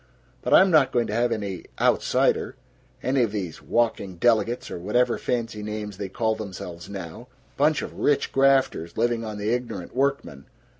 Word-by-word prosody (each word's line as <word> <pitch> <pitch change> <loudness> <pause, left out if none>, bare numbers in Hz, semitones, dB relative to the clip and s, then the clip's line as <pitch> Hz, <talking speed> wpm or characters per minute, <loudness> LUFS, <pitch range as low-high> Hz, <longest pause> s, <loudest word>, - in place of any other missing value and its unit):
But - - -3
I'm 190 0 +6
not 150 -5 +5
going 120 -1 +1
to - - -4
have 120 +1 +1
any 100 -5 -3
outsider, - - +2 0.5
any 130 0 +2
of 115 -4 +1
these 95 -6 -5
walking 110 -5 0
delegates, 115 +4 +1
or - - -5
whatever 120 +7 +1
fancy 115 -3 -2
names 105 -2 -5
they 100 -1 -5
call 110 +3 0
themselves 95 -5 -7
now 100 +4 -8 0.3
bunch 150 +2 +2
of - - -7
rich 145 - +1
grafters, 135 -11 +2
living 115 0 +1
on 110 -2 -5
the 105 +2 -1
ignorant 115 -7 -4
workmen! 135 - -1
110 Hz, 165 wpm, -25 LUFS, 100-125 Hz, 0.5 s, I'm